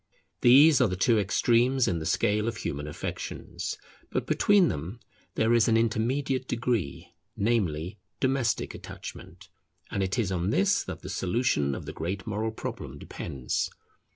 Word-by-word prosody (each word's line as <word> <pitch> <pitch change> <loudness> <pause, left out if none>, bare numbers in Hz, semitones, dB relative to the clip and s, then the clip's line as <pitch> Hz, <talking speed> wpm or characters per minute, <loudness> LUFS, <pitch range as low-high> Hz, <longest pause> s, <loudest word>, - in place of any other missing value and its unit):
These 135 +4 +7
are 125 - +5
the 90 - -2
two 110 +4 +3
extremes 120 +6 +2
in 85 - 0
the 80 - -4
scale 105 -1 +1
of 115 -1 -2
human 75 -5 -4
affections; 75 - -5 0.3
but - - -2
between 205 -3 +4
them 85 +8 -4 0.4
there 110 +1 +3
is 115 -2 +4
an 115 -1 +4
intermediate 130 +4 0
degree, 115 - -2 0.2
namely, 100 -4 0 0.2
domestic 130 -3 0
attachment, - - -10 0.4
and 100 - -1
it 95 +3 -1
is 105 -6 0
on 90 0 0
this 100 -2 +3
that - - -7
the - - -7
solution 90 - 0
of - - -7
the - - -6
great 95 +4 -4
moral 110 0 -1
problem 110 - -6
depends. 65 -6 -3
110 Hz, 155 wpm, -28 LUFS, 90-120 Hz, 0.4 s, These